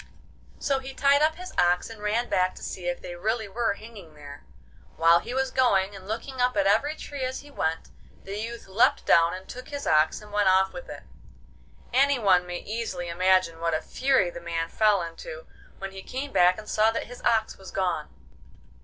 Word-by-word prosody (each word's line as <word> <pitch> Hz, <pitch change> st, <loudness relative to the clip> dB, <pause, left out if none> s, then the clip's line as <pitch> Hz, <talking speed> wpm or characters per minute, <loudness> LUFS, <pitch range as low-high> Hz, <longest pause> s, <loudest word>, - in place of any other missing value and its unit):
So 275 Hz, -1 st, 0 dB
he 265 Hz, 0 st, -9 dB
tied 280 Hz, +1 st, +4 dB
up 315 Hz, +1 st, +3 dB
his 365 Hz, +2 st, -9 dB
ox 175 Hz, 0 st, +3 dB
and 225 Hz, -2 st, -11 dB
ran 220 Hz, +4 st, 0 dB
back 185 Hz, 0 st, +1 dB
to -, -, -11 dB
see 180 Hz, -2 st, -5 dB
if 175 Hz, 0 st, -2 dB
they 175 Hz, -, -6 dB
really 220 Hz, +4 st, -1 dB
were 225 Hz, +2 st, 0 dB
hanging 200 Hz, -8 st, -12 dB
there. 145 Hz, -1 st, -11 dB, 0.5 s
While 165 Hz, +1 st, +5 dB
he -, -, -8 dB
was 265 Hz, 0 st, 0 dB
going, 200 Hz, -6 st, +2 dB
and 190 Hz, -1 st, -11 dB
looking 250 Hz, +4 st, -4 dB
up 250 Hz, -3 st, +2 dB
at 200 Hz, -, +3 dB
every 250 Hz, +10 st, +2 dB
tree 285 Hz, -3 st, -7 dB
as 255 Hz, 0 st, -3 dB
he 290 Hz, -, -15 dB
went, 160 Hz, -, -2 dB, 0.3 s
the 200 Hz, +2 st, -5 dB
youth 230 Hz, 0 st, -6 dB
leapt 195 Hz, +4 st, +2 dB
down 165 Hz, +1 st, +4 dB
and 185 Hz, +1 st, -10 dB
took 255 Hz, +1 st, -9 dB
his 285 Hz, -1 st, -5 dB
ox 155 Hz, +1 st, +3 dB
and 210 Hz, -1 st, -14 dB
went 205 Hz, -2 st, +3 dB
off 190 Hz, +1 st, +3 dB
with -, -, -9 dB
it. -, -, -8 dB, 0.9 s
Any 275 Hz, +2 st, +4 dB
one 185 Hz, -5 st, +3 dB
may 175 Hz, 0 st, -5 dB
easily 205 Hz, -5 st, -4 dB
imagine 185 Hz, -1 st, +2 dB
what 165 Hz, -1 st, +1 dB
a -, -, 0 dB
fury 260 Hz, -10 st, +1 dB
the 170 Hz, -, -9 dB
man 165 Hz, -1 st, -3 dB
fell 210 Hz, -3 st, +3 dB
into 485 Hz, -, -8 dB, 0.3 s
when 195 Hz, 0 st, -6 dB
he 195 Hz, 0 st, -9 dB
came 270 Hz, +7 st, -5 dB
back 180 Hz, +1 st, +4 dB
and 215 Hz, 0 st, -9 dB
saw 215 Hz, +1 st, +3 dB
that 225 Hz, -, -2 dB
his 245 Hz, +1 st, -11 dB
ox 220 Hz, -1 st, +1 dB
was 190 Hz, -, -10 dB
gone. 180 Hz, -5 st, -1 dB
205 Hz, 210 wpm, -26 LUFS, 180-250 Hz, 0.9 s, While